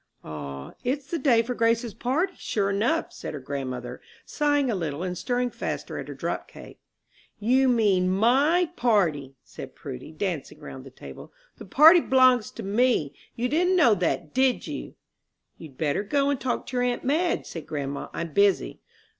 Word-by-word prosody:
"Ah, 70 -3 -7
it's 265 +3 -2
the 335 - -1
day 245 -5 +4
for 250 +2 -3
Grace's 230 -1 +1
party, 285 - -1
sure 200 -2 -1
enough," 235 +12 0
said - - -7
her - - -5
grandmother, 130 -2 -5 0.2
sighing 290 -3 +1
a - - 0
little, 165 -4 -3
and 180 -1 -3
stirring 245 +6 -1
faster - - -5
at - - -7
her - - -7
drop - - -4
cake. - - -13 0.6
"You 255 +5 +3
mean 200 -6 +3
my 275 - +3
party," 165 - +1
said - - -10
Prudy, 65 - -8
dancing 160 -3 -4
around 130 0 -10
the - - -10
table. 130 - -12 0.3
"The - - -9
party 320 +5 +7
b'longs 255 - +4
to - - -7
me. 205 - +1 0.2
You 240 +2 -1
didn't 355 +7 +2
know 280 -11 +5
that, 175 -4 -2
did 260 0 +2
you?" - - -7 0.6
"You'd 145 -6 -12
better 150 +2 0
go 280 +7 +1
and 280 - -2
talk 250 0 -2
to 250 - -5
your 245 - +2
aunt 245 -1 -1
Madge," 320 +7 0
said 165 -3 -8
grandma, 140 -2 -4
"I'm 170 -2 -5
busy." 200 +1 +2
230 Hz, 175 wpm, -25 LUFS, 160-260 Hz, 0.6 s, party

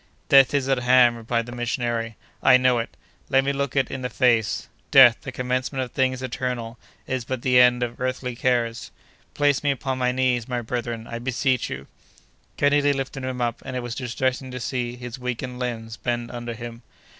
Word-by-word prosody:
"Death 135 0 +6
is 135 -2 +1
at 135 -2 +2
hand," 125 -1 +5
replied 115 0 -2
the 120 - -9
missionary, 120 -2 -2 0.3
"I 130 - +7
know 125 -1 +3
it! 115 - -6 0.3
Let 135 0 +4
me 140 +1 0
look 140 -1 -2
it 135 -2 +1
in 135 - -4
the 125 - -3
face! 110 -4 +1 0.2
Death, 130 -5 +8
the - - -6
commencement 130 +1 -2
of 125 - -8
things 130 -1 0
eternal, 125 -3 -4 0.3
is 130 -2 -2
but 125 0 -4
the 125 -1 +5
end 125 0 +5
of 120 +1 -5
earthly 130 -1 -2
cares. 120 -2 0 0.5
Place 145 -2 +2
me 145 - +2
upon 135 -1 -2
my 125 0 +2
knees, 125 -2 0
my 125 -2 -2
brethren, 115 -1 -4
I 115 0 -6
beseech 130 +1 0
you!" 70 +1 -6 0.7
Kennedy 145 0 +3
lifted 135 0 -4
him 130 -1 -3
up, 120 -1 -1
and 130 - -6
it 125 - -3
was 120 -1 -4
distressing 130 +1 -2
to 125 0 -6
see 120 0 -3
his 125 +1 -8
weakened 125 0 -4
limbs 115 -2 -4
bend 120 -1 -3
under 120 -1 -5
him. 120 0 -8
125 Hz, 195 wpm, -24 LUFS, 120-130 Hz, 0.7 s, Death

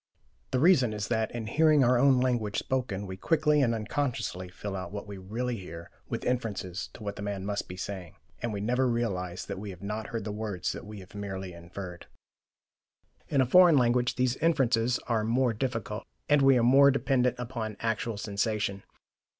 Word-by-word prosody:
The 130 - 0
reason 130 -8 +5
is 105 -1 -4
that, 110 -2 +1
in 120 -2 -5
hearing 150 +4 +4
our 125 +1 +4
own 130 +1 +5
language 120 -5 0
spoken, 120 -7 -2
we 95 -1 -7
quickly 150 - +2
and 115 -4 +2
unconsciously 110 -6 -2
fill 95 +2 -6
out 95 -1 -5
what 100 0 -6
we 100 -2 -8
really 115 +6 -3
hear 85 -3 -9 0.2
with - - -3
inferences 105 -6 -2
to 110 - -10
what 100 -1 -4
the - - -6
man 100 -2 -3
must 100 0 -2
be 90 - -8
saying, 95 -3 -6 0.3
and 120 - -2
we 100 -1 -3
never 125 +4 +1
realize 95 -7 -2
that 100 -2 -5
we 105 0 -6
have 95 0 -10
not 105 +1 -4
heard 115 -2 -4
the 105 - -4
words 105 -4 -3
we 105 -1 -9
have 90 - -15
merely 95 -2 -5
inferred. 85 +1 -9 1.2
In 140 -3 +3
a - - +4
foreign 175 +3 +7
language, 125 0 +2
these 125 0 +1
inferences 125 -7 +2
are 115 -3 0
more 120 +2 +2
difficult, 115 -3 -3 0.2
and 145 -1 +4
we 135 -1 +6
are 120 - +2
more 135 +3 +7
dependent 130 -2 +2
upon 115 -4 -4
actual 115 -1 -1
sensation. 100 -1 -1
110 Hz, 190 wpm, -29 LUFS, 100-125 Hz, 1.2 s, foreign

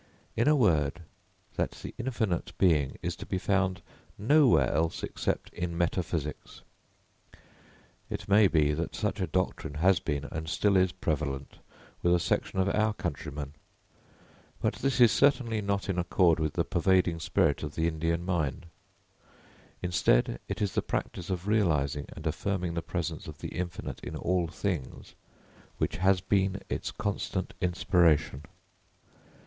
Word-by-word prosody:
In 115 - +2
a 150 - +6
word, 85 - +2 0.5
that - - +1
the - - -6
Infinite 115 -8 -1
Being 75 -8 +2
is - - -2
to - - -8
be - - -1
found 95 -1 0 0.3
nowhere 105 - +4 0.2
except - - -3
in 85 -1 -3
metaphysics. 85 -3 -2 1.5
It 105 - -5
may 100 +1 +6
be, 75 -4 +2
that 80 +3 -3
such 105 -1 -2
a 90 - 0
doctrine 80 -3 -2
has 90 +3 +4
been 70 -2 -3
and 80 0 -4
still 100 +2 +2
is 95 -1 +4
prevalent 75 -6 -3 0.4
with 85 0 +4
a - - +2
section 85 +2 -1
of 95 0 +2
our 110 +2 +2
countrymen. 75 -6 -5 1.1
But - - -1
this 135 -1 0
is 120 -3 +7
certainly 125 -6 +2
not 100 -1 -1
in 95 -2 -1
accord 85 -1 +3
with 80 -1 -1
the - - 0
pervading 90 -1 +2
spirit 75 -2 +1
of 75 -2 -5
the 80 0 +1
Indian 85 +1 -1
mind. 85 -6 -1 1.2
Instead, - - +2
it - - -2
is 100 - -1
the - - +1
practice 90 +2 -4
of 90 -1 -3
realising 75 -9 +1
and 80 - -10
affirming 90 +2 -1
the 85 - -2
presence 85 -2 -4
of 75 -1 -8
the - - -6
infinite 90 0 -5
in - - -7
all 90 -1 0
things 85 -4 -4 0.6
which - - -1
has 95 0 +3
been 95 +1 +1
its - - -2
constant 100 -2 -3
inspiration. 85 -6 +2
90 Hz, 145 wpm, -29 LUFS, 80-100 Hz, 1.5 s, is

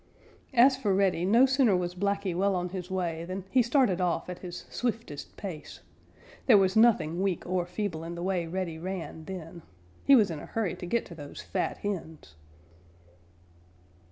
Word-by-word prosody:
As 260 +3 +7
for 205 -7 +1
Reddy, 190 -3 +2
no 230 +7 +6
sooner 260 -7 +3
was 175 0 -2
Blacky 200 -1 -1
well 195 +2 +2
on 180 0 -2
his 180 0 -6
way 170 -3 -2
than 185 +2 -5
he 260 - +5
started 235 -6 +2
off 175 -1 0
at 180 - -8
his 180 0 -8
swiftest 225 - -4
pace. 180 -7 -7 0.7
There 230 -6 +8
was 190 -1 +3
nothing 185 -7 +4
weak 190 -3 -1
or 180 -1 -1
feeble 180 -3 -3
in 170 +1 -6
the 170 - -5
way 180 -3 -1
Reddy 170 -2 -3
ran 175 -3 -6
then. 170 -2 -8 0.4
He 275 - +7
was 210 -7 +4
in 155 - -5
a - - -9
hurry 215 -7 -1
to 175 - -7
get 235 +5 0
to - - -10
those 145 -3 -9
fat - - -2
hens. 160 - -5
185 Hz, 180 wpm, -29 LUFS, 170-205 Hz, 0.7 s, There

